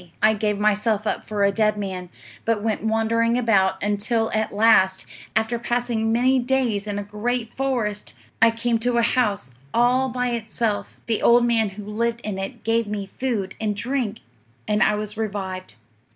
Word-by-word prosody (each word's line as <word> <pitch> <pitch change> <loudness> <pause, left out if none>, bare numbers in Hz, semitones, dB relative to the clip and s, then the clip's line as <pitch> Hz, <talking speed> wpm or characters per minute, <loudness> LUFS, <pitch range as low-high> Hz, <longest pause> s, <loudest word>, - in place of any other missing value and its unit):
"'I 215 0 +6
gave 210 -1 -1
myself 210 +1 +1
up - - -2
for 210 -1 -1
a 200 - +4
dead 215 0 +1
man, 185 -3 -5 0.3
but 225 -2 0
went 220 -1 -1
wandering 225 +1 +1
about, 200 -6 +3
until 210 +2 0
at 220 0 0
last, 200 -3 +4 0.3
after 225 +2 +1
passing 240 -2 -1
many 255 +3 +3
days 245 -5 0
in 205 -1 -3
a 205 - -2
great 225 +3 -3
forest, 240 -6 -2 0.3
I 230 - +8
came 230 0 0
to 240 +1 0
a 235 - +3
house, 210 - +1 0.2
all 250 +2 +3
by 250 0 -1
itself; 225 -2 -2
the 225 -2 -1
old 240 0 +5
man 225 -3 +2
who 210 - -7
lived 230 +3 -2
in 205 -4 -4
it 225 +4 -6
gave 225 0 +1
me 205 -1 -3
food 205 -4 -3
and 210 -1 0
drink, 235 -1 -2 0.5
and 210 0 +1
I 210 - +4
was 210 0 -5
revived. 190 - -4
220 Hz, 175 wpm, -23 LUFS, 205-235 Hz, 0.5 s, I